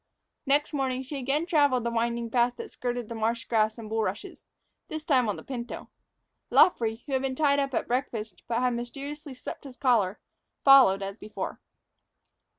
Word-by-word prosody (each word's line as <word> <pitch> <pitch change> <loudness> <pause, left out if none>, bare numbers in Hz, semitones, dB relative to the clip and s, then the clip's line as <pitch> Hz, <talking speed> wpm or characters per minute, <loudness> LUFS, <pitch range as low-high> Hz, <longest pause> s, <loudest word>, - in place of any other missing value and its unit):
Next 290 +3 +2
morning 265 -2 -1
she 275 +2 -5
again 275 +5 0
traveled 285 -8 +3
the 235 - -1
winding 235 0 -1
path 245 0 +2
that - - -8
skirted 245 -2 -3
the 230 - -6
marsh 230 +1 -1
grass 220 -1 +1
and 225 -2 -8
bulrushes, 220 - -3 0.5
this 310 -1 -5
time 260 -8 +3
on 205 - -1
the - - -10
pinto. 245 -3 -6 0.6
Luffree, 225 -9 +4
who 290 - -8
had 260 - +2
been 265 -1 -2
tied 285 -1 +3
up 275 -2 -1
at - - -1
breakfast, 225 -6 -3
but 235 +1 0
had 250 -1 +2
mysteriously 275 +4 -6
slipped 250 - -8
his 265 -3 -11
collar, 220 -7 +2 0.4
followed, 260 -9 +7
as 195 +2 -6
before. 210 0 -6
245 Hz, 175 wpm, -27 LUFS, 230-275 Hz, 0.6 s, followed